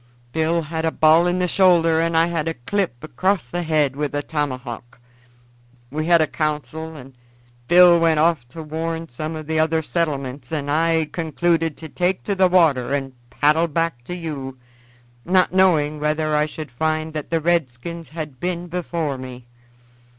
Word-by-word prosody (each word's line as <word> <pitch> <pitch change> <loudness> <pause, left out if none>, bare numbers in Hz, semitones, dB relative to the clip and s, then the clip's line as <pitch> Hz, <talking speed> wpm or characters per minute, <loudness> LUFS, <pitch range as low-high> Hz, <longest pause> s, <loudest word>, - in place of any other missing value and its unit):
Bill 160 +1 +1
had 160 +1 -4
a 165 - +2
ball 160 +2 +4
in 175 +1 +1
the 180 0 +1
shoulder, 170 -3 +4
and 165 0 0
I 165 - +5
had 165 -2 -2
a 165 - -2
clip 125 - -2
across 155 -1 -1
the 175 - -2
head 155 -5 +1
with 145 0 -3
a 145 - -1
tomahawk. 130 -6 -4 0.9
We 155 +2 -2
had 170 -1 +5
a - - +4
council, 155 +1 -3
and 135 -2 -12 0.5
Bill 175 0 +7
went 165 -2 +3
off 155 -6 +2
to 160 +6 -9
warn 165 +1 -4
some 155 +6 -5
of 155 -1 -7
the 160 +1 -1
other 160 0 +1
settlements 140 -6 -3
and 145 -2 -2
I 160 0 +2
concluded 165 -1 0
to 160 - -8
take 180 +4 -1
to 205 - -1
the 190 -1 +4
water 145 -8 +3
and 135 -2 -4 0.2
paddle 155 +3 +2
back 165 -5 -2
to 180 - -5
you, 140 -6 -6 0.7
not 185 0 +2
knowing 155 -6 +3
whether 155 0 0
I 150 0 +2
should 155 -2 -8
find 155 +4 -1
that 155 -2 -5
the 165 - +1
redskins 165 0 -2
had 155 -5 -7
been 175 +1 -3
before 165 -5 -3
me. 125 -1 -9
160 Hz, 175 wpm, -21 LUFS, 145-170 Hz, 0.9 s, Bill